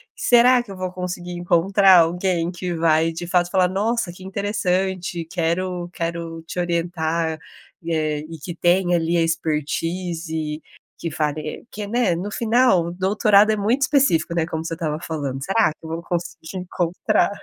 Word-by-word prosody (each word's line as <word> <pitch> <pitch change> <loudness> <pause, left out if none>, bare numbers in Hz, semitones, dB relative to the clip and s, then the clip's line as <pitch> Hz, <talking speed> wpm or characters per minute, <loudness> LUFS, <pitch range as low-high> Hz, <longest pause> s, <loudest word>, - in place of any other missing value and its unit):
Será 245 +1 +5
que 215 - -12
eu - - -7
vou 185 -1 -4
conseguir 180 -1 -5
encontrar 180 +2 +4
alguém 175 0 +1
que 180 0 -4
vai 165 0 +2
de 170 +1 -6
fato 175 0 +2
falar: 185 -2 +3
"Nossa, 210 +1 -1
que 185 +2 -13
interessante! 190 -3 -1
Quero 175 +1 -2
quero 165 -1 -4
te 180 - -4
orientar" 170 -2 -1 0.4
e, 165 0 -2
eh, 155 -2 0
e 165 0 -8
que 170 +3 -7
tem 175 +1 +2
ali 165 0 0
a 170 - +3
expertise 165 0 -2 0.4
que 165 - -4
fari 155 +2 -3
que 210 - -6
é, - - -5
né, 235 -4 +1
no 180 +5 -3
final, 225 -5 +3
o - - -4
doutorado 200 +3 +4
é - - +2
muito 225 +7 +1
específico, 265 - +2
né, 165 -2 +1
como 160 -1 -4
você 165 - -3
estava 155 -2 -3
falando. 140 -5 -4
Será 195 +9 +2
que 160 - -15
eu - - -6
vou 165 +1 -4
conseguir 175 0 -4
encontrar? 180 +4 0
175 Hz, 170 wpm, -22 LUFS, 165-190 Hz, 0.4 s, Será